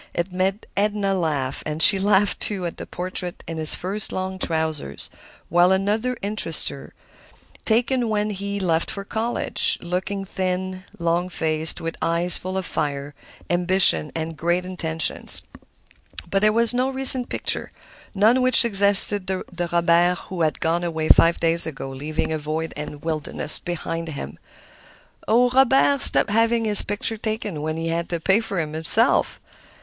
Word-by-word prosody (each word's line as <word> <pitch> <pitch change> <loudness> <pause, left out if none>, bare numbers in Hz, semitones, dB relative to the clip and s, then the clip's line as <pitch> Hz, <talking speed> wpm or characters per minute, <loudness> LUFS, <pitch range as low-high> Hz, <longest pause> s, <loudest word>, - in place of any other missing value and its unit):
It 170 +2 -3
made 190 +3 -2
Edna 205 -1 0
laugh, 150 -7 -2
and 150 0 -5
she 195 +4 +9
laughed, 200 0 +1
too, 195 -4 -3
at 170 - -6
the - - -9
portrait 180 0 -6
in 165 - -6
his 155 -1 +4
first 195 +3 -2
long 185 0 -5
trousers; 160 - -3 0.4
while 175 +2 +3
another 210 +6 -1
interested 200 -6 -1
her, 140 - -12 0.7
taken 240 +1 0
when 210 0 -1
he 200 0 -5
left 170 -3 -1
for 200 - -5
college, 225 +3 -1
looking 190 +3 -4
thin, 185 0 -4
long 170 +1 -1
faced, 160 -2 -1
with 165 0 -6
eyes 170 +2 +1
full 185 +1 -4
of 190 - -3
fire, 145 -2 -4 0.3
ambition 175 - +3
and 160 0 -5
great 175 +4 -1
intentions. 165 -4 0 0.9
But 195 - +1
there 215 0 +3
was 230 +2 +1
no 255 +2 0
recent 265 -1 +7
picture, - - -2 0.4
none 220 +6 +3
which 255 -1 +5
suggested 200 -2 +3
the 190 -1 -4 0.3
Robert 170 +1 +2
who 185 -2 -5
had 155 -1 -1
gone 170 +1 -1
away 160 -2 -3
five 170 0 +5
days 165 0 +4
ago, 135 -3 -7
leaving 150 +4 -4
a 155 - -3
void 155 +2 -5
and 150 0 -8
wilderness 155 -1 -2
behind 165 -1 -5
him. 140 - -8 0.9
"Oh, 245 +3 +3
Robert 270 +1 +3
stopped - - +6
having 230 +1 +1
his 210 -1 +9
pictures 210 +2 -2
taken 215 -7 -4
when 155 +1 -4
he 165 0 -4
had 170 +1 -3
to 170 - -3
pay 190 +6 +2
for 200 -5 -4
them 155 -2 -4
himself! 165 +9 0
180 Hz, 160 wpm, -21 LUFS, 160-205 Hz, 0.9 s, she